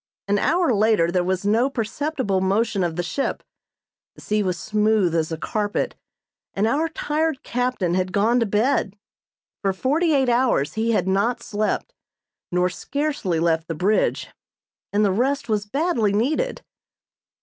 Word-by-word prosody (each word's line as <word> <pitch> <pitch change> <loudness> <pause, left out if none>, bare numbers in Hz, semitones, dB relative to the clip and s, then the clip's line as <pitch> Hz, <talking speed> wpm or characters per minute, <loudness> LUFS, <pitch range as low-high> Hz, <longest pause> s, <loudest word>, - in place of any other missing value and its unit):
An 205 0 +2
hour 335 - +2
later 210 -5 +3
there 180 0 +1
was 185 +1 -1
no 230 +6 +3
perceptible 250 -4 -2
motion 200 +1 +1
of 170 -2 -1
the 175 - -1
ship, 270 +10 -2 0.7
the - - -14
sea 210 0 0
was 185 -3 -1
smooth 210 -2 +1
as 160 -1 0
a 160 - -2
carpet, 205 +5 -2 0.6
and 200 - +1
our 295 +8 +1
tired 310 -2 -1
captain 245 -8 -1
had 185 0 0
gone 220 +5 +2
to 230 - +1
bed. 215 -1 +1 0.6
For 195 -1 +1
forty 300 - +1
eight 265 -2 +2
hours 240 - +2
he 225 +1 -1
had 210 - +1
not 230 +6 +1
slept, 215 - -2 0.6
nor 180 0 +2
scarcely 280 - -2
left 165 -1 +1
the 165 - -3
bridge, 200 +6 +1 0.6
and 210 +1 +2
the 200 - +2
rest 265 +8 0
was 210 -2 -1
badly 245 - +1
needed. 300 - 0
215 Hz, 155 wpm, -23 LUFS, 190-260 Hz, 0.7 s, later